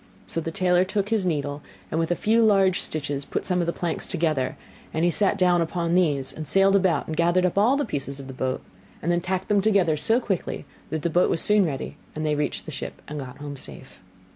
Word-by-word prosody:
So 165 - -3
the 165 - -3
tailor 180 +1 +3
took 200 +1 -2
his 215 -5 +1
needle, 145 -3 -2 0.3
and 160 - 0
with 165 0 0
a 175 - +2
few 225 +5 +2
large 195 -4 +4
stitches 145 -2 -2
put - - -4
some 180 -1 0
of 170 - 0
the - - +2
planks 170 -1 -2
together; 155 -6 0 0.4
and 160 +2 +2
he 175 - +3
sat 200 +2 +2
down 180 -2 +3
upon 170 0 -1
these, 145 -7 +2
and 155 -1 -7
sailed 195 +4 +4
about 185 -6 +2
and 160 - -4
gathered 175 +2 +3
up 180 - 0
all 225 +7 +4
pieces 140 - -5
of 135 - -8
the 130 - -8
boat; 130 0 -2 0.4
and 170 - +1
then 175 0 +1
tacked 185 +1 -2
them 205 -1 +3
together 195 -6 +3
so 225 +10 +3
quickly 195 -8 -3 0.2
that 160 -2 -3
the 170 - 0
boat 175 +3 +3
was 165 - +1
soon 210 -3 +4
ready, 135 -4 -5 0.2
and 155 0 -3
they 155 - +1
then 150 - 0
reached 150 - -2
the - - -7
ship - - -6
and 150 0 -5
got 130 -2 -8
home 145 -1 -7
safe. 130 -2 -9
170 Hz, 245 wpm, -25 LUFS, 150-190 Hz, 0.4 s, large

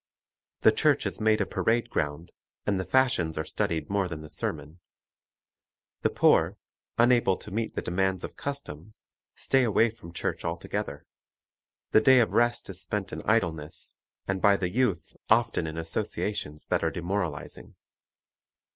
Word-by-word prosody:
The - - +7
church - - +2
is - - -3
made 110 0 +3
a - - +2
parade 115 +1 0
ground, 75 +3 -2 0.3
and 100 -2 +1
the 95 - -2
fashions 110 -8 +2
are 80 - 0
studied 80 0 -1
more 100 -1 0
than 80 -3 -6
the 75 -1 -9
sermon. 80 +4 -4 1.2
The - - +2
poor, - - +3 0.4
unable 120 -5 +4
to 105 - -11
meet 110 +3 -2
the - - -2
demands 95 0 0
of - - -6
custom, 110 - -6 0.4
stay 135 -1 +2
away 115 0 +3
from 95 -7 -12
church 85 - -3
altogether. - - -4 0.9
The 110 - +6
day 130 +3 +7
of 115 - +2
rest 120 0 +2
is 95 -1 -5
spent 100 +1 -3
in - - -4
idleness, 80 -9 -1 0.3
and 95 -1 -1
by 100 -1 +5
the 90 -3 -1
youth 110 -7 0
often 80 - +3
in 80 +1 -5
associations 80 -2 -3
that - - 0
are - - +2
demoralizing. 85 -5 -4
95 Hz, 155 wpm, -28 LUFS, 80-110 Hz, 1.2 s, The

